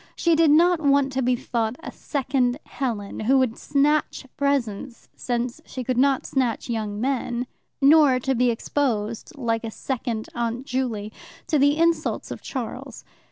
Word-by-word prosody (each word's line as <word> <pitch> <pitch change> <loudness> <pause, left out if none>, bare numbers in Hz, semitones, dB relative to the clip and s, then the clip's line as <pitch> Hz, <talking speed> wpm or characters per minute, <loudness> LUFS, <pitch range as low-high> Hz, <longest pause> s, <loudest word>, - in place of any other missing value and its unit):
She 335 -1 +2
did 325 -1 +4
not 340 +3 +5
want 280 -2 +3
to 265 0 -1
be 250 0 +2
thought 230 -1 -2
a - - -6
second 265 -3 -1
Helen, 225 -7 -4
who 255 +5 +3
would 255 -3 +1
snatch 295 0 0
presents 270 -4 -2
since 245 +4 -3
she 255 - -6
could 250 0 -1
not 270 0 +3
snatch 250 -2 -1
young 210 -2 -3
men, 250 -1 -1 0.4
nor 285 -3 +6
to 265 +2 0
be 250 0 +2
exposed, 230 -3 -2
like 230 -3 -1
a 225 - -3
second 230 -1 -4
Aunt 235 +2 -3
Juley, 230 -6 -3 0.3
to 305 - +1
the 285 +2 +4
insults 335 0 0
of - - -6
Charles. - - -6
255 Hz, 160 wpm, -24 LUFS, 235-280 Hz, 0.4 s, nor